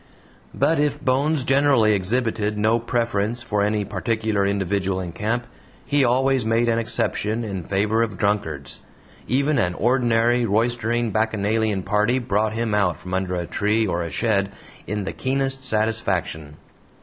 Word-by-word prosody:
But 160 -1 +2
if 145 -1 0
Bones 140 +2 +1
generally 135 -5 +3
exhibited 105 +1 -1
no 110 +2 +2
preference 115 -1 -1
for 105 -4 -1
any 105 0 0
particular 110 +1 -1
individual 95 -1 -1
in 90 -2 -5
camp, 115 +7 -2 0.4
he 145 -1 +2
always 130 +1 +2
made 115 +2 +1
an 115 0 +2
exception 110 0 -1
in 100 -5 -4
favor 105 +3 +1
of 110 -5 -2
drunkards. 80 -9 -2 0.5
Even 140 +3 +1
an 90 -5 0
ordinary 120 0 +2
roistering 115 +1 0
bacchanalian 110 -2 0
party 105 +6 +1
brought 110 -3 0
him 115 -1 -1
out 100 -5 +1
from 90 - -8
under 95 -1 -1
a 85 -1 -2
tree 105 +5 0
or 90 -3 -1
a 85 - -3
shed 100 0 0 0.4
in 105 -1 -2
the - - -4
keenest 135 0 -1
satisfaction. 100 - -1
110 Hz, 150 wpm, -22 LUFS, 100-120 Hz, 0.5 s, generally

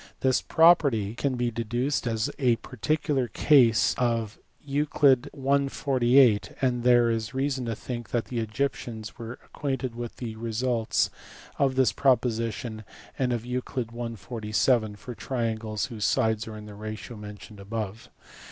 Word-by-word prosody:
This 130 -1 +3
property 140 - +4
can 130 +2 -1
be 120 -1 0
deduced 120 +4 -1
as 110 -2 -1
a 125 -4 +4
particular 130 +3 -1
case 115 - +4
of 115 -3 0 0.3
Euc. 140 -2 +3
i. 140 0 +1
48: 125 -4 +3
and 125 -2 +1
there 120 -1 +5
is 115 +2 -3
reason 135 -1 -1
to 115 -1 -2
think 120 -1 -6
that 120 -2 -1
the 120 - -3
Egyptians 110 -1 -3
were 115 +1 -6
acquainted 130 -4 -3
with 120 0 -6
the 115 -3 -5
results 115 0 0 0.5
of 135 -2 +2
this 130 -5 +4
proposition 115 -3 0 0.4
and 130 -2 +1
of 120 -2 -1
Euc. 120 -1 -4
i. - - -7
47 110 0 0
for 125 +4 -8
triangles 110 -4 -2
whose 110 -5 -4
sides 110 -4 +1
are 110 -1 -7
in 105 - -9
the 105 - -10
ratio 110 +3 -7
mentioned 105 0 -10
above. 105 +1 -5
120 Hz, 145 wpm, -27 LUFS, 110-130 Hz, 0.5 s, there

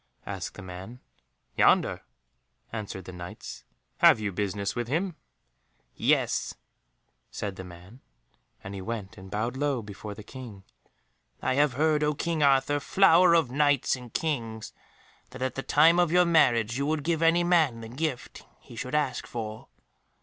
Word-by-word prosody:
asked 95 -3 -5
the 100 - -9
man. 95 +7 -9 0.6
"Yonder," - - +3 0.7
answered 100 -4 -6
the 95 - -8
Knights. 90 0 -9 0.3
"Have - - +6
you 105 -2 -2
business 100 +1 -2
with 120 -1 -2
him?" 170 +6 -1 0.8
"Yes," - - +1 0.7
said 100 -2 -5
the 95 - -8
man, 90 +7 -13 0.6
and 95 - -7
he 95 - -6
went 110 0 -5
and 95 -2 -12
bowed 110 +5 -2
low 140 -3 -1
before 105 0 -8
the 105 - -10
King: 115 -5 -10 0.8
"I 130 - 0
have 145 0 +3
heard, 150 +2 +2
O 150 0 +1
King 165 +1 -2
Arthur, 140 0 +3
flower 180 +1 +5
of 160 -7 +2
Knights 145 -1 +2
and 125 -2 -11
Kings, 115 -9 -3 0.6
that - - -6
at 130 -1 -1
the 135 - -4
time 160 +5 +4
of 175 -2 +3
your 180 +1 +5
marriage 120 -8 +3
you 140 - 0
would 155 -1 -1
give 165 0 0
any 165 +1 +4
man 160 -9 +2
the 115 - -8
gift 130 +1 -4 0.2
he - - -14
should 125 +5 -4
ask 150 -4 -1
for." 110 -2 -6
125 Hz, 160 wpm, -27 LUFS, 105-150 Hz, 0.8 s, Have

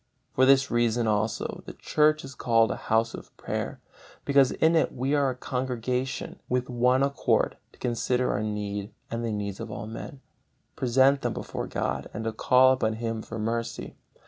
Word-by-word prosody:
For 130 0 +4
this 135 0 +5
reason 120 0 +2
also 110 0 -1
the - - -7
Church 155 -1 +2
is 135 - -9
called 115 -4 +2
a - - -2
House 110 +1 +2
of - - -11
Prayer, - - -4 0.5
because 140 -2 +5
in 160 +1 +3
it 160 - +3
we 130 +3 -1
are 140 -2 +3
as 130 - -3
a - - -25
congregation 125 0 -3
with 125 0 -1
one 125 +2 +3
accord 140 -1 +1 0.2
to - - -22
consider 125 +1 0
our 100 - -1
need 105 -1 -3 0.2
and 115 0 -2
the 115 - -1
needs 100 -2 -4
of 115 0 -6
all 105 - -6
men, 115 +6 -8 0.6
present 130 +2 +3
them - - -1
before - - -5
God, - - -3
and 110 0 -3
call 130 +3 +5
upon 110 -4 0
Him 115 0 -3
for 110 - -7
mercy. 115 +1 -3
120 Hz, 180 wpm, -27 LUFS, 110-130 Hz, 0.6 s, this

